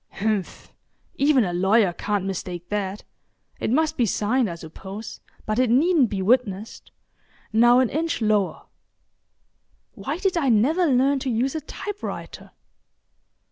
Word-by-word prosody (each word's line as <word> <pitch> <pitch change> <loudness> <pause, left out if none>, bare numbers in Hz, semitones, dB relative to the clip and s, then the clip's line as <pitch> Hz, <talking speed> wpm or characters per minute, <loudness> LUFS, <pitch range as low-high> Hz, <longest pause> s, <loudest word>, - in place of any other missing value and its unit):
H'mph!—even 220 +6 -1
a 180 -3 -2
lawyer 190 +1 +3
can't 205 +1 -2
mistake 180 -2 -5
that. 205 -1 -3 0.6
It - - -2
must 315 +5 +1
be 240 - +2
signed, 220 +4 +1
I 170 - -5
suppose, 190 +6 -9 0.3
but 215 +2 -1
it 255 -2 +3
needn't 285 +1 +4
be 195 -2 -2
witnessed. 215 -2 0 0.6
Now 240 +2 +6
an 255 -2 +3
inch 330 +3 -1
lower—why 215 - -5
did 380 -1 0
I 280 -5 +1
never 290 - +3
learn 270 +1 +3
to 260 - -3
use 245 +3 0
a 315 - -3
type 405 +7 -7
writer? - - -7
230 Hz, 135 wpm, -23 LUFS, 200-275 Hz, 0.6 s, Now